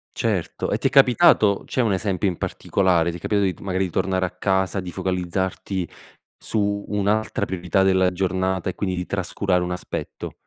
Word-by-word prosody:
Certo, -, -, -2 dB
e -, -, 0 dB
ti -, -, +2 dB
è -, -, +1 dB
capitato? 120 Hz, -6 st, +5 dB
C'è 130 Hz, -, -1 dB
un 110 Hz, -4 st, +2 dB
esempio 95 Hz, 0 st, 0 dB
in 90 Hz, -3 st, -2 dB
particolare? 85 Hz, -3 st, +1 dB
Ti 85 Hz, -, -7 dB
è -, -, -14 dB
capitato 100 Hz, +3 st, +1 dB
di -, -, -12 dB
magari 95 Hz, -1 st, 0 dB
di 90 Hz, -, -6 dB
tornare 95 Hz, +1 st, 0 dB
a 90 Hz, -, -4 dB
casa, 95 Hz, +1 st, 0 dB
di 90 Hz, -1 st, -6 dB
focalizzarti 95 Hz, 0 st, -2 dB, 0.5 s
su 100 Hz, -1 st, -1 dB
un'altra 105 Hz, +1 st, 0 dB
priorità 95 Hz, +1 st, 0 dB
della 95 Hz, -1 st, +3 dB
giornata, 95 Hz, 0 st, -1 dB
e 90 Hz, -, -5 dB
quindi 95 Hz, -3 st, -2 dB
di 90 Hz, 0 st, -3 dB
trascurare 95 Hz, -1 st, 0 dB
un 90 Hz, -, -3 dB
aspetto? 90 Hz, -2 st, -5 dB
95 Hz, 185 wpm, -23 LUFS, 90-100 Hz, 0.5 s, capitato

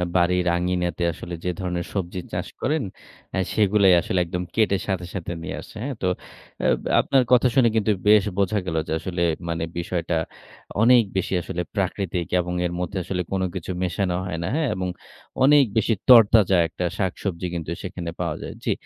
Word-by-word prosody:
বাড়ির 90 Hz, 0 st, +3 dB
আঙিনাতে 90 Hz, 0 st, -1 dB
আসলে 85 Hz, -, -8 dB
যে -, -, +1 dB
ধরনের 90 Hz, -2 st, -2 dB
সবজি 95 Hz, -2 st, -3 dB
চাষ 90 Hz, +1 st, -2 dB
করেন 150 Hz, 0 st, 0 dB, 0.5 s
আ -, -, -1 dB, 0.2 s
সেগুলো 105 Hz, -1 st, +3 dB, 0.2 s
আসলে 90 Hz, -, -1 dB
একদম 90 Hz, +1 st, -3 dB
কেটে 105 Hz, -3 st, +3 dB
সাথে, 95 Hz, -2 st, -1 dB
সাথে 85 Hz, -1 st, -4 dB
নিয়ে -, -, -4 dB
আসে। -, -, -14 dB
হ্যাঁ 135 Hz, -2 st, -3 dB
তো 95 Hz, -, +1 dB, 0.6 s
আপ -, -, +2 dB, 0.2 s
আপনার 135 Hz, -2 st, +3 dB
কথা 125 Hz, 0 st, +6 dB
শুনে 120 Hz, -3 st, +5 dB
কিন্তু 110 Hz, -1 st, +2 dB, 0.2 s
বেশ 105 Hz, -2 st, +7 dB
বোঝা 100 Hz, +1 st, +1 dB
গেল 80 Hz, -, -3 dB
যে -, -, -5 dB
আসলে 90 Hz, 0 st, -4 dB, 0.3 s
মানে 85 Hz, 0 st, -2 dB, 0.2 s
বিষয়টা 85 Hz, -1 st, -2 dB, 0.7 s
অনেক 120 Hz, 0 st, +6 dB
বেশি 95 Hz, -, -1 dB
আসলে 90 Hz, 0 st, -4 dB
প্রাকৃতিক 95 Hz, -3 st, -1 dB
এবং 90 Hz, 0 st, -2 dB
এর 85 Hz, -, -1 dB
মধ্যে 95 Hz, +2 st, -3 dB
আসলে 90 Hz, +1 st, -2 dB
কোন 95 Hz, -1 st, 0 dB
কিছু 95 Hz, +1 st, -4 dB
মেশানো 90 Hz, +1 st, -1 dB
হয় 90 Hz, -3 st, -4 dB
না। 85 Hz, -, -2 dB
হ্যাঁ 155 Hz, -3 st, +1 dB
এবং 90 Hz, 0 st, -2 dB, 0.6 s
অনেক 145 Hz, +1 st, +7 dB
বেশি 110 Hz, +1 st, +3 dB, 0.2 s
তরতাজা 110 Hz, -5 st, +7 dB
একটা 90 Hz, +2 st, -4 dB
শাকসবজি 95 Hz, -2 st, -2 dB
কিন্তু 85 Hz, -1 st, -4 dB
সেখানে 90 Hz, -2 st, -5 dB
পাওয়া 85 Hz, -4 st, -1 dB
যায়। -, -, -6 dB
জি, -, -, 0 dB
90 Hz, 180 wpm, -23 LUFS, 90-105 Hz, 0.7 s, বেশ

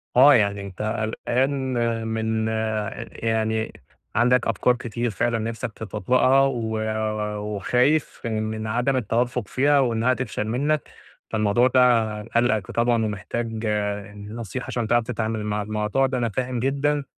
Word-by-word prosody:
آه، 140 Hz, +4 st, +8 dB
يعني 100 Hz, -3 st, +2 dB
أنت 100 Hz, -1 st, -8 dB
قلقان 120 Hz, +2 st, -1 dB
من 110 Hz, 0 st, -1 dB
آآ 110 Hz, 0 st, -2 dB
يعني 110 Hz, -1 st, -1 dB, 0.4 s
عندك 125 Hz, +2 st, +3 dB
أفكار 115 Hz, +2 st, +2 dB
كتير 120 Hz, 0 st, -3 dB
فعلًا 115 Hz, +3 st, 0 dB
نفسك 115 Hz, +1 st, -4 dB
تتطبقها، 125 Hz, +6 st, +2 dB
و 115 Hz, -5 st, 0 dB, 0.8 s
وخايف 125 Hz, +9 st, +1 dB
من 110 Hz, -1 st, -2 dB
عدم 120 Hz, +5 st, +1 dB
التوفق 120 Hz, -1 st, -1 dB
فيها، 140 Hz, +7 st, +3 dB
وإنها 120 Hz, -1 st, +2 dB
تفشل 115 Hz, -4 st, -3 dB
منك، 145 Hz, +6 st, 0 dB, 0.4 s
فالموضوع 110 Hz, +2 st, +3 dB
ده 130 Hz, 0 st, +4 dB, 0.4 s
قالقك 115 Hz, -3 st, 0 dB
طبعًا 115 Hz, -1 st, +2 dB
ومحتاج 110 Hz, +2 st, -4 dB, 0.5 s
ن 105 Hz, +2 st, -9 dB
نصيحة 115 Hz, +1 st, -5 dB
عشان 120 Hz, -2 st, -2 dB
تعرف 120 Hz, +1 st, +3 dB
تتعامل 110 Hz, -2 st, -2 dB
مع 105 Hz, 0 st, -1 dB
الموضوع 105 Hz, +5 st, 0 dB
ده، 130 Hz, -1 st, -2 dB
أنا 120 Hz, -2 st, 0 dB
فاهم 125 Hz, +3 st, -2 dB
جدًا، 140 Hz, +3 st, 0 dB
115 Hz, 135 wpm, -24 LUFS, 110-125 Hz, 0.8 s, آه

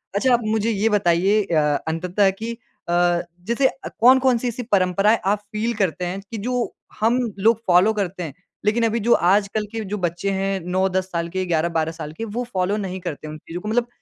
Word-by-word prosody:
अच्छा, 250 Hz, +5 st, +3 dB
आप 240 Hz, -, +4 dB
मुझे 220 Hz, +1 st, +1 dB
ये 215 Hz, +2 st, +1 dB
बताइए 200 Hz, +1 st, +3 dB
अ, 165 Hz, -5 st, +1 dB, 0.3 s
अंततः 180 Hz, +5 st, +1 dB
कि 225 Hz, +1 st, -3 dB, 0.4 s
अ, 175 Hz, 0 st, +3 dB, 0.2 s
जैसे 235 Hz, +6 st, +2 dB, 0.3 s
कौन-कौन 255 Hz, +1 st, +5 dB
सी 245 Hz, -, -3 dB
ऐसी 240 Hz, +1 st, -3 dB
परंपराएँ 195 Hz, +3 st, +3 dB
आप 200 Hz, +2 st, +2 dB
फील 225 Hz, +2 st, -1 dB
करते 185 Hz, -3 st, -1 dB
हैं 185 Hz, +3 st, -3 dB
कि 225 Hz, -, -4 dB
जो 245 Hz, +3 st, -2 dB, 0.3 s
हम 230 Hz, +4 st, +3 dB, 0.2 s
लोग 225 Hz, +2 st, +3 dB
फॉलो 185 Hz, +5 st, +5 dB
करते 190 Hz, -3 st, -3 dB
हैं। 150 Hz, -5 st, -6 dB, 0.3 s
लेकिन 225 Hz, +3 st, +2 dB
अभी 230 Hz, +1 st, 0 dB
जो 235 Hz, +3 st, 0 dB
आजकल 200 Hz, +4 st, +2 dB
के 225 Hz, -1 st, -4 dB
जो 210 Hz, -, -2 dB
बच्चे 175 Hz, +4 st, -2 dB
हैं। 195 Hz, 0 st, -1 dB
9-10 185 Hz, +1 st, -1 dB
साल 170 Hz, -1 st, -2 dB
के, 185 Hz, +1 st, -2 dB
11-12 165 Hz, -1 st, 0 dB
साल 155 Hz, -2 st, -7 dB
के 225 Hz, +8 st, -5 dB
वो 230 Hz, +3 st, -3 dB
फॉलो 185 Hz, +2 st, 0 dB
नहीं 190 Hz, -2 st, -4 dB
करते 155 Hz, -2 st, -6 dB
उन 155 Hz, 0 st, -7 dB
चीज़ों 170 Hz, +3 st, -8 dB
को 210 Hz, -, -7 dB
मतलब 240 Hz, +1 st, +1 dB
200 Hz, 200 wpm, -22 LUFS, 175-225 Hz, 0.4 s, कौन-कौन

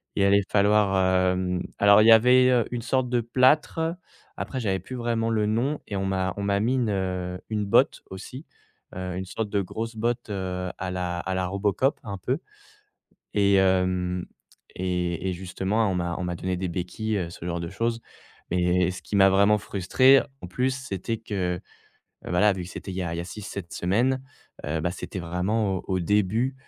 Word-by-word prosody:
il -, -, +1 dB
allait 100 Hz, 0 st, +4 dB
falloir 95 Hz, -3 st, +3 dB
hem, 90 Hz, -1 st, -1 dB, 0.2 s
alors 100 Hz, +1 st, +7 dB
il -, -, +4 dB
y -, -, +9 dB
avait 125 Hz, +1 st, +6 dB
une 120 Hz, -1 st, -3 dB
sorte 130 Hz, -2 st, 0 dB
de 120 Hz, -1 st, +2 dB
plâtre. 130 Hz, +7 st, +3 dB, 0.6 s
Après, 130 Hz, -, -4 dB
j'avais 95 Hz, -5 st, 0 dB
plus 130 Hz, +8 st, -8 dB
vraiment 115 Hz, -1 st, -1 dB
le 105 Hz, -1 st, +1 dB
nom 125 Hz, +7 st, 0 dB
et 100 Hz, -, -4 dB
on 95 Hz, 0 st, -1 dB
m'a 95 Hz, -1 st, -1 dB
on 100 Hz, -, -3 dB
m'a 100 Hz, 0 st, +1 dB
mis 120 Hz, +5 st, +1 dB
une, 120 Hz, -4 st, +1 dB
heu, 90 Hz, -1 st, -3 dB
une 105 Hz, -2 st, -1 dB
botte 100 Hz, -, +3 dB
aussi, 125 Hz, +10 st, -8 dB, 0.5 s
heu, 90 Hz, -1 st, -4 dB
une 95 Hz, -, -4 dB
sorte 105 Hz, +3 st, -4 dB
de 100 Hz, -1 st, +1 dB
grosse 115 Hz, +5 st, -5 dB
botte, 115 Hz, 0 st, -2 dB
heu, 90 Hz, -2 st, -3 dB
à 90 Hz, 0 st, -4 dB
la 90 Hz, -1 st, -2 dB
à 95 Hz, +1 st, -3 dB
la 95 Hz, -1 st, -1 dB
Robocop 100 Hz, +8 st, 0 dB
un 100 Hz, -6 st, -5 dB
peu, 130 Hz, -, -1 dB, 1.0 s
et 100 Hz, -1 st, +4 dB
hem, 90 Hz, -1 st, +1 dB, 0.5 s
et 90 Hz, 0 st, -2 dB
et -, -, -1 dB
justement, 95 Hz, +4 st, -1 dB
on -, -, -1 dB
m'a 85 Hz, -1 st, -2 dB
on 90 Hz, -, -3 dB
m'a 90 Hz, -1 st, -2 dB
donné 90 Hz, +1 st, -2 dB
des 95 Hz, -, -2 dB
béquilles, 90 Hz, +5 st, -3 dB
heu, 85 Hz, -3 st, -3 dB
ce 85 Hz, -, -10 dB
genre 85 Hz, -1 st, -2 dB
de 85 Hz, 0 st, -4 dB
choses, 115 Hz, +3 st, -2 dB, 0.5 s
mais 90 Hz, 0 st, +2 dB
ce 90 Hz, -, -7 dB
qui 105 Hz, -, -4 dB
m'a 95 Hz, 0 st, +6 dB
vraiment 100 Hz, +2 st, +4 dB
frustré 130 Hz, +9 st, +4 dB, 0.2 s
en 90 Hz, -, -7 dB
plus, 125 Hz, +8 st, 0 dB
c'était 115 Hz, -3 st, -4 dB
que 95 Hz, -5 st, -3 dB, 0.6 s
voilà, 100 Hz, +4 st, +3 dB
vu 90 Hz, -2 st, -5 dB
que -, -, -10 dB
c'était 95 Hz, -, -7 dB
il 90 Hz, -, -6 dB
y 95 Hz, -, -1 dB
a 85 Hz, -1 st, -3 dB
il -, -, -3 dB
y -, -, -1 dB
a -, -, -5 dB
6-7 100 Hz, -1 st, -7 dB
semaines, 125 Hz, +9 st, +1 dB, 0.4 s
heu, 80 Hz, +2 st, -1 dB
bah, 90 Hz, +2 st, -1 dB
c'était 95 Hz, -, -6 dB
vraiment 95 Hz, +4 st, -1 dB
au -, -, -6 dB
au 95 Hz, -2 st, 0 dB
début 105 Hz, +7 st, +1 dB
95 Hz, 200 wpm, -25 LUFS, 90-110 Hz, 1.0 s, y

